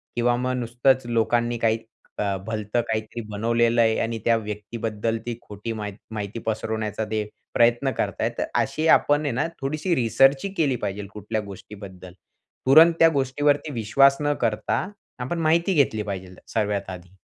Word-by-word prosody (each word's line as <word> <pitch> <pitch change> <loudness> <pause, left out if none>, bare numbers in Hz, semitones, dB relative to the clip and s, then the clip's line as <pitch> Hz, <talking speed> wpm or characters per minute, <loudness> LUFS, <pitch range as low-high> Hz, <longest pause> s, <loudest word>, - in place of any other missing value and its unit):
किंवा 120 0 +2
मग 125 +1 -1
नुसतंच 120 +2 +1
लोकांनी 120 0 +1
काही 115 -1 +1 0.4
अ, 100 -1 0
भलतं 110 +1 -1
काहीतरी 110 +1 -3
बनवलेलं 115 +2 +2
आहे 110 -1 +3
आणि 115 0 -1
त्या 115 -1 +4
व्यक्तीबद्दल 110 +1 -3
ती 120 -1 -4
खोटी 105 +2 -7
मा 105 -1 -4 0.2
माहिती 105 +1 -5
पसरवण्याचा 110 0 -2
ते 110 -1 0 0.3
प्रयत्न 120 +3 +3
करत - - 0
आहेत. - - -1
अशी 160 +1 0
आपण 145 -1 +4
आहे 145 - 0
ना 165 - 0
थोडीशी 155 +6 -1
रिसर्चही 135 - +3
केली 145 -5 +2
पाहिजे 100 +1 -3
कुठल्या 105 +1 -3
गोष्टीबद्दल. 95 -2 -11 0.5
तुरंत 160 +6 +8
त्या 165 - +7
गोष्टीवरती 145 +2 +1
विश्वास 135 +5 +4
न 145 0 +1
करता 115 - 0 0.3
आपण 130 +8 -3
माहिती 170 +4 +2
घेतली 125 -8 +2
पाहिजे 95 -3 -6 0.2
सगळ्यात 100 -3 0
आधी. 90 0 -10
115 Hz, 155 wpm, -24 LUFS, 105-135 Hz, 0.5 s, तुरंत